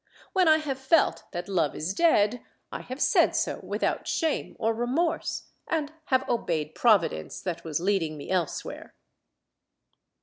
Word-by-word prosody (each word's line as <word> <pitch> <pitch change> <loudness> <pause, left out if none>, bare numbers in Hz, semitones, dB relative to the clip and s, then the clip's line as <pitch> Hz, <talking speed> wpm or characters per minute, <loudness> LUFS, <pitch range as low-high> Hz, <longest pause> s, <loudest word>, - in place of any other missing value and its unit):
When 370 -2 +4
I 315 0 +7
have 285 -4 -3
felt 275 +4 +2
that 175 -1 -5
love 170 -7 0
is 160 +5 -2
dead, 245 -5 +3 0.3
I - - -5
have 255 +2 -7
said - - +4
so - - 0
without - - -2
shame 320 -3 -1
or 225 0 +1
remorse, 290 +9 -1 0.2
and 310 -2 -1
have 260 0 +1
obeyed 160 -10 -1
Providence 185 - +2
that 170 -2 -4
was 160 -2 -2
leading 175 -4 0
me 145 - -7
elsewhere. 180 -5 -3
220 Hz, 145 wpm, -27 LUFS, -, 0.3 s, I